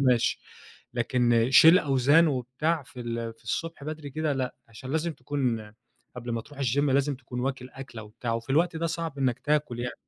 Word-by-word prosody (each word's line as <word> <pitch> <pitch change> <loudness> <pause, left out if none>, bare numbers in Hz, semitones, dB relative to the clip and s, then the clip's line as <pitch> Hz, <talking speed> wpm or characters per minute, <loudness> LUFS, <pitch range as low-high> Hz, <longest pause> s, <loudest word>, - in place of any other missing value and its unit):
ماشي، 120 - +1 0.5
لكن 120 -1 +2
شيل 160 +6 +8
أوزان 140 +4 +4
وبتاع 140 +5 -1
في 125 0 -11
ال 115 -1 -4
في - - -27
الصبح 165 -3 -3
بدري 155 -2 -6
كده 155 +1 -1
لأ، 130 -2 -2
علشان 115 +4 -9
لازم 160 +2 0
تكون 125 -6 -2 0.4
قبل 120 -1 -5
ما 115 - -1
تروح 145 +4 -15
الGym 130 +2 +1
لازم 140 0 +2
تكون 125 -1 -7
واكل 130 -1 -3
أكلة 130 -5 -9
وبتاع، 115 +2 -5
وفي 115 +3 -5
الوقت 165 +4 +2
ده 165 +1 -1
صعب 165 -3 -4
إنك 130 -3 +1
تاكل 150 -5 0
يعني، 120 0 -3
130 Hz, 185 wpm, -27 LUFS, 120-150 Hz, 0.5 s, شيل